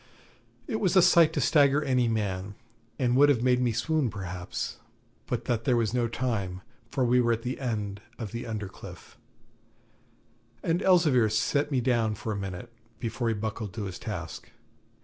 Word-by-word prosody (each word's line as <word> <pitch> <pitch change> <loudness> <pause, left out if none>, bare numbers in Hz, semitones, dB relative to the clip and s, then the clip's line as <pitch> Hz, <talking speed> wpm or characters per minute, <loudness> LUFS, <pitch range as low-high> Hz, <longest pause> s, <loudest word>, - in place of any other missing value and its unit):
It 220 - -2
was 190 -2 +1
a 185 - +8
sight 170 -3 +6
to - - -1
stagger 145 -1 +4
any 130 -3 +2
man, 100 -3 -2 0.4
and 125 -2 +1
would 145 +2 +6
have 125 -5 +2
made 125 0 +3
me 125 -2 +2
swoon 135 +4 0
perhaps, 90 -3 -5 0.5
but - - -3
that 115 -2 -1
there 125 -2 +3
was 115 -1 0
no 120 -2 +1
time, 105 -6 -2 0.3
for 130 0 0
we 125 +1 +4
were 120 -1 +2
at 115 0 -4
the 125 +1 -3
end 105 -6 -3 0.2
of 110 -5 -6
the 120 +1 -5
under 105 -3 -4
cliff, 95 - -12 1.5
and 170 +3 +1
Elzevir 155 - +4
set 140 +7 +1
me 135 -4 +1
down 115 -3 +1
for 110 +2 -5
a - - -2
minute, 100 +4 -6 0.3
before 115 0 -2
he 115 - +1
buckled 110 -2 -4
to 110 - -3
his 95 -2 -6
task. 90 -6 -6
115 Hz, 180 wpm, -28 LUFS, 105-130 Hz, 1.5 s, a